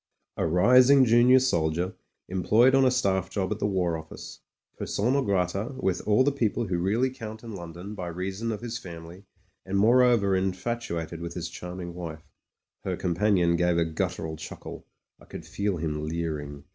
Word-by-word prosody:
A - - 0
rising 125 - +6
junior 120 +2 +6
soldier, 85 -7 0 0.3
employed 105 +8 +3
on 135 0 +5
a - - +5
staff 95 -7 0
job 95 -1 -2
at 105 - -2
the - - 0
War 90 -4 0
Office, 80 0 -10 0.4
persona 125 +7 0
grata 100 +3 -1
with 95 -1 -1
all 105 +4 +4
the 145 - +2
people 120 -4 -1
who 90 -3 -1
really 110 +9 +1
count 110 -3 -8
in 115 -2 -8
London 90 +2 -8
by 90 -4 -5
reason 95 +6 -3
of 110 - -5
his 120 0 -5
family, 85 +1 -10 0.4
and 95 +1 -2
moreover 115 -2 +4
infatuated 95 -4 -3
with 85 0 -6
his 85 -1 -4
charming 90 0 -7
wife." 80 -3 -7 0.6
Her - - -2
companion 90 -1 +2
gave 90 0 +2
a 85 - +2
guttural 80 -1 -3
chuckle; 80 - -9 0.3
I - - -17
could - - -9
feel 100 -2 -2
him 75 -2 -3
leering. 75 -3 -4
95 Hz, 170 wpm, -27 LUFS, 85-115 Hz, 0.6 s, rising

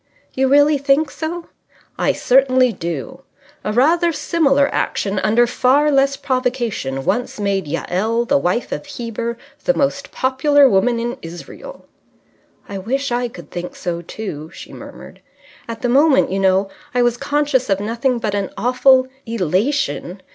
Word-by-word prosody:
"You 265 0 +1
really 290 +2 +4
think 280 +2 +2
so?" 335 +1 -5 0.5
"I - - +1
certainly 255 -1 +3
do. 170 -6 -5 0.4
A 210 - -2
rather 330 +9 +3
similar 285 -4 +2
action, 195 -1 -1
under 225 +4 +3
far 270 +5 +2
less 275 0 +2
provocation, 240 - -2
once 215 +5 -1
made 195 -4 -1
Jael 210 +9 -1
the 280 +3 +2
wife 185 +5 -1
of - - -5
Heber 235 -3 -5 0.3
the 265 - +3
most 280 0 -1
popular 275 +2 +3
woman 235 +2 +2
in 240 +1 -3
Israel." 175 - -10 0.8
"I 200 -1 -5
wish 270 +7 -2
I 245 0 0
could 175 -9 -13
think 175 0 -6
so 170 -2 -4
too," 165 -4 -7
she - - -11
murmured. - - -12 0.5
"At 230 +1 -7
the - - +2
moment, 275 - +4
you 195 - -1
know, 195 +1 +2 0.2
I 245 - +3
was 240 -1 +2
conscious 285 -1 0
of 195 -1 +2
nothing 230 +4 -1
but 215 -3 -3
an 200 -1 -1
awful 255 +1 +4 0.2
elation. 210 - -1
245 Hz, 150 wpm, -19 LUFS, 200-275 Hz, 0.8 s, really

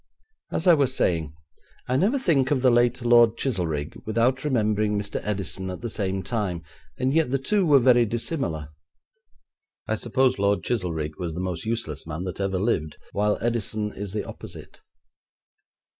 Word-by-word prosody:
As 165 - -1
I 180 - +8
was 135 -4 +2
saying, 80 -4 0 0.6
I 125 - 0
never 205 - +2
think 145 - +2
of 135 -3 +1
the 130 - +6
late 120 +1 +2
Lord 120 -1 +5
Chizelrigg 85 - -2
without 120 +4 +1
remembering 105 -6 +1
Mr. 100 0 -3
Edison 95 -2 -3
at 90 - -6
the 120 -2 -4
same 95 -2 -2
time, 95 -4 -2 0.3
and 130 +1 0
yet 160 -3 +2
the 135 - +1
two 190 +7 +1
were 145 -2 +7
very 120 -2 +5
dissimilar. 100 - -2 1.2
I - - 0
suppose 130 -3 +1
Lord 100 -2 +2
Chizelrigg 80 -9 -2
was 85 -3 -4
the - - -4
most 90 -1 -4
useless 80 -11 -3
man 80 +3 -4
that 95 0 -5
ever 95 -1 0
lived, 90 -7 -1
while 105 +1 +1
Edison 110 -2 -1
is 100 -1 -6
the 105 +1 -2
opposite. - - -10
110 Hz, 165 wpm, -25 LUFS, 95-130 Hz, 1.2 s, I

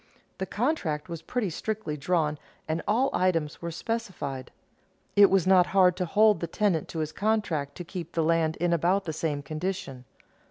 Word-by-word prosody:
The 190 - -2
contract 195 - -1
was 170 -2 -5
pretty 215 -1 -2
strictly 215 -2 -3
drawn 150 0 0 0.3
and 160 +1 -1
all 255 +6 +2
items 165 -5 0
were 170 - -3
specified. 170 - -4 0.7
It 200 -1 +8
was 190 -3 +3
not 185 -1 +5
hard 180 -2 +6
to 180 - 0
hold 210 +1 +4
the 170 - -3
tenant 195 -7 0
to 165 - -5
his 155 0 -3
contract 190 -9 -1
to 175 - -6
keep 175 0 -7
the 165 - +1
land 160 -1 +2
in 175 0 +1
about 180 +4 +2
the 160 - -3
same 150 -2 -2
condition. 155 -4 -4
170 Hz, 175 wpm, -27 LUFS, 155-200 Hz, 0.7 s, It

